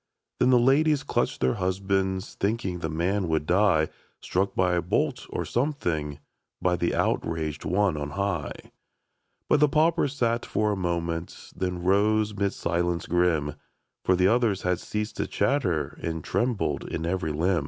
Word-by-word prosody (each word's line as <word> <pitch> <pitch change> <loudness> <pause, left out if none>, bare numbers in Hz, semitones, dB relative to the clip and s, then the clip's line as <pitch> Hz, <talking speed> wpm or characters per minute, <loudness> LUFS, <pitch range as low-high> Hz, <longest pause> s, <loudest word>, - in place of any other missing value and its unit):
Then - - +4
the 125 - +6
ladies 140 +4 +3
clutched - - -1
their 65 0 +3
husbands 95 0 -1
Thinking 100 -3 -2
the 80 - -3
man 90 +4 0
would 80 -2 0
die. 90 -3 +3 0.3
Struck 95 +2 -1
by 90 -1 +2
a 85 - +2
bolt, 90 - -1
or - - -3
something, 85 - -1 0.4
By 90 -1 +2
the 85 0 0
outraged 80 -2 -1
One 95 -2 +2
on 75 0 -3
high. 100 -7 -3 0.8
But 150 - +4
the 150 0 +5
pauper 160 +2 +3
sat 120 -4 0
for 105 0 0
a - - 0
moment, 85 -2 -3
Then 90 -1 -3
rose 105 +3 +2
'mid 100 0 +1
a - - 0
silence 85 -2 -1
grim, 80 -4 +1 0.5
For 95 - +3
the 90 +1 +3
others 110 -3 +2
had 90 -1 +1
ceased 105 +2 -4
to - - -1
chatter 90 - 0
And 80 -1 -3
trembled 115 - -1
in 80 - -3
every 85 -2 -1
limb. 85 +4 +1
95 Hz, 165 wpm, -26 LUFS, 85-105 Hz, 0.8 s, the